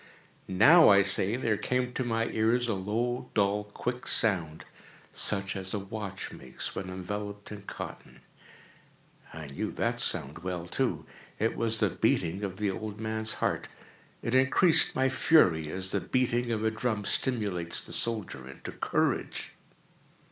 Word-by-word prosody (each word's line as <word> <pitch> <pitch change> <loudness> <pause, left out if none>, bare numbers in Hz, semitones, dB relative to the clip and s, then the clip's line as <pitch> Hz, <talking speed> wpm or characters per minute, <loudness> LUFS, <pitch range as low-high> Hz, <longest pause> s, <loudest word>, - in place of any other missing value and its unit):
—now, 145 - +7
I 100 -1 +6
say, 95 +2 +1
there 115 -4 0
came 125 +2 -1
to 130 - -2
my 115 -1 0
ears 115 +3 +1
a 115 - 0
low, 120 +6 -2
dull, 105 0 +1
quick 125 +4 -5
sound, 85 -8 +1 0.5
such 100 -1 +2
as 95 +1 +1
a - - -1
watch 100 -1 -6
makes 65 0 -5
when 95 -1 -5
enveloped 105 +3 -6
in 105 -1 -8
cotton. 100 - -9 1.1
I 80 -1 -8
knew 70 - -4
that - - -1
sound 70 +4 0
well, 90 -1 -4
too. 90 - -2 0.3
It 110 +2 0
was 115 -1 +2
the - - +2
beating 90 +5 0
of 95 -2 -4
the 105 -1 0
old 105 +1 -6
man's 110 0 -1
heart. - - -2 0.6
It 115 - -2
increased 130 +6 +5
my 130 0 +2
fury, 110 - +3
as 95 +3 -1
the - - 0
beating 120 -1 0
of 110 -1 -1
a 110 - +2
drum 110 -2 -2
stimulates 100 -11 +1
the - - -5
soldier 105 - -2
into 70 - -9
courage. - - -1
105 Hz, 155 wpm, -29 LUFS, 95-115 Hz, 1.1 s, now